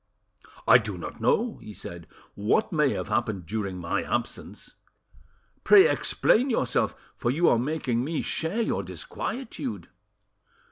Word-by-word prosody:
"I - - +8
do - - -5
not - - -8
know," 245 - +1
he 105 - -9
said, 85 -4 -9 0.3
"what 145 - +1
may 150 -3 +3
have - - -4
happened 110 -7 -1
during 100 -1 -3
my 90 +3 -1
absence; 120 -1 -4 0.9
pray 410 +1 +8
explain 255 - +2
yourself, 130 - 0 0.2
for 120 - -2
you 165 +7 +2
are 115 - +4
making 130 -3 -1
me 160 +3 -2
share 175 +8 -1
your - - -1
disquietude." 220 - -5
125 Hz, 135 wpm, -26 LUFS, -, 0.9 s, I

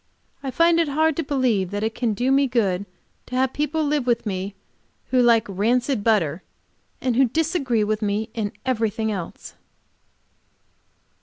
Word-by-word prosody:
I 275 - -4
find 335 +4 +3
it 330 - +2
hard 315 +2 +2
to 330 - 0
believe 250 -10 +1
that 205 +2 -3
it 220 +1 -1
can 235 -3 -1
do 250 +5 +1
me 275 0 +4
good 200 -6 0 0.4
to 250 - -6
have 260 0 +1
people 300 +2 -1
live 290 -3 0
with 235 -1 +1
me 195 0 -3 0.6
who 255 -1 +4
like 235 -2 +4
rancid 230 +4 0
butter, 185 -8 +1 0.6
and 250 -2 0
who 265 +2 +5
disagree 275 - 0
with 215 +1 -1
me 210 +2 -1
in 210 -3 -2
everything 225 -3 0
else. 185 -5 -6
235 Hz, 160 wpm, -23 LUFS, 210-270 Hz, 0.6 s, who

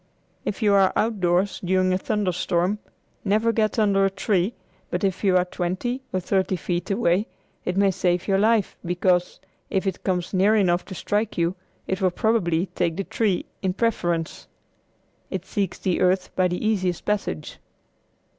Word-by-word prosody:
If 210 - -3
you 205 -1 +4
are 195 -1 +5
outdoors 195 -3 +1
during 185 0 +2
a - - +2
thunder 205 -2 0
storm 175 +4 0 0.4
never 215 +3 +2
get 220 -1 0
under 200 -3 +3
a 195 - +4
tree, 195 +2 0 0.3
but - - -2
if 190 0 0
you 190 -2 +4
are 180 - +2
twenty 185 +9 -3
or 185 - 0
thirty 190 +1 0
feet 175 +1 -3
away 195 -1 +2 0.4
it 180 +1 -1
may 200 -1 +4
save 180 -1 0
your 195 -1 +3
life, 220 -1 +2
because, 180 0 +1 0.3
if 190 +1 0
it 190 -2 -3
comes 180 -1 -1
near 195 +3 +4
enough 180 -4 +2
to 190 - -8
strike 210 +4 -1
you, 170 +1 +1 0.3
it 190 +1 -2
will 185 - +4
probably 180 -4 +1
take 170 -3 -2
the 195 - -1
tree 200 -2 0 0.2
in 185 -2 0
preference. 175 -7 -1 0.8
It 190 -1 -4
seeks 195 -2 -2
the 185 -2 -1
earth 185 0 +1
by 185 -1 +3
the 180 +4 -3
easiest 185 -5 0
passage. 200 - -2
190 Hz, 170 wpm, -24 LUFS, 180-205 Hz, 0.8 s, are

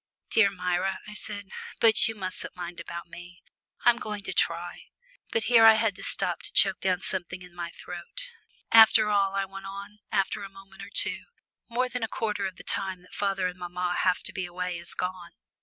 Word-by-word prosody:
"Dear 210 -3 +6
Myra," 180 0 -1
I 210 - -8
said. 205 -2 -5 0.3
"But 225 -2 +5
you 225 - -3
mustn't 185 -2 -5
mind 175 -1 -6
about 170 0 -7
me. 175 +1 -12 0.4
I'm 240 -1 +6
going 210 -3 -5
to - - -4
try 170 +1 -1 0.2
" - - -31
but 465 - +1
here 235 -2 +6
I 225 0 +10
had 220 -2 +1
to 195 - -11
stop - - -1
to - - -4
choke 195 -1 +5
down 185 -1 0
something 180 -1 -2
in 180 -1 -14
my 175 -1 -5
throat. 180 - -7 0.4
"After 220 -1 +8
all," 195 -1 +2
I 195 0 +1
went 195 0 -9
on, 200 +2 -8
after 200 +1 0
a 200 - -6
moment 195 0 -14
or - - -8
two, - - 0 0.4
"more 250 +2 +1
than 250 0 -4
a 225 - 0
quarter 210 -3 -2
of 185 - -8
the - - -12
time 190 -2 -1
that 180 - -19
father 195 -2 0
and 180 0 -3
mamma 180 0 -2
have 185 -1 +2
to - - -4
be 185 -3 -3
away 180 0 -4
is 170 - -11
gone. 180 -1 -4
195 Hz, 210 wpm, -27 LUFS, 180-210 Hz, 0.4 s, I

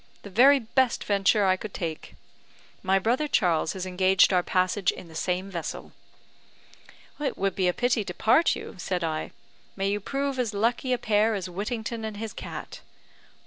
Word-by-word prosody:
The 200 - -10
very 270 +8 +6
best 255 +1 0
venture 200 +1 +2
I 185 -1 +4
could 210 +1 -8
take. 160 -3 -5 0.7
My 190 +1 +2
brother 240 +9 +1
Charles 170 - +1
has 185 -1 -5
engaged 185 +1 +3
our 180 - +4
passage 185 +2 +1
in 170 - -5
the - - -13
same 180 +4 -2
vessel." 170 -3 -5 1.3
"It 295 -2 -2
would 195 -1 0
be 185 -1 0
a - - +4
pity 245 +2 0
to 180 - -5
part 250 - +3
you," - - -8
said 180 -1 -2
I. 155 -1 -2 0.5
"May 195 0 -1
you 205 - -1
prove 275 +4 -3
as 225 -4 -1
lucky 240 +5 0
a 250 - +3
pair 215 -1 +2
as 185 -2 -5
Whittington 220 +4 -4
and 215 -2 -5
his 220 0 -5
cat." - - -8
200 Hz, 180 wpm, -26 LUFS, 185-230 Hz, 1.3 s, very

